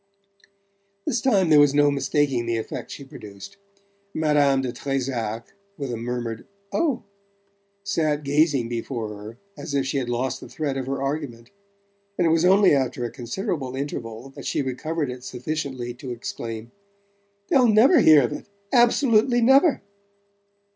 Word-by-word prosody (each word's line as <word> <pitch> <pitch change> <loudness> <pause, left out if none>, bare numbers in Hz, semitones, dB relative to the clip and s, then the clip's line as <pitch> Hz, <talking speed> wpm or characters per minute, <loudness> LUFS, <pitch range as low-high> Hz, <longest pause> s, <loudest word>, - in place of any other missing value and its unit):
This 250 -6 0
time 195 -10 +3
there 150 - +7
was 145 -1 +5
no 145 0 +4
mistaking 135 -3 0
the 115 -1 0
effect 110 - -5
she 140 - -8
produced. 110 - -11 0.6
Madame 145 -3 +3
de 125 - -2
Trezac, 120 -4 -3 0.2
with 140 -5 -4
a - - -2
murmured 115 -1 -4 0.3
"Oh," 295 -7 0 0.8
sat 155 -7 0
gazing 145 -3 +2
before 115 -1 -4
her 105 +3 -10 0.2
as 145 - -6
if 135 -1 +1
she 135 +1 -1
had 125 -2 -4
lost 130 +2 -2
the - - -10
thread 145 -3 -3
of 130 -1 -4
her 135 0 -2
argument; 135 -5 -4 0.7
and 175 - +2
it 165 - +3
was 165 +1 +3
only 195 0 +6
after 130 -3 0
a 120 - -4
considerable 135 - -4
interval 120 -3 -5
that 135 - -9
she - - 0
recovered 145 +2 -3
it 125 0 -9
sufficiently 130 -2 -4
to 125 +2 -9
exclaim: 115 -1 -6 0.8
"They'll 260 -6 +5
never 230 - +6
hear 155 -3 +7
of 120 - -1
it - - -8 0.3
absolutely 240 -1 +4
never!" 270 - +4
135 Hz, 155 wpm, -24 LUFS, 120-160 Hz, 0.8 s, there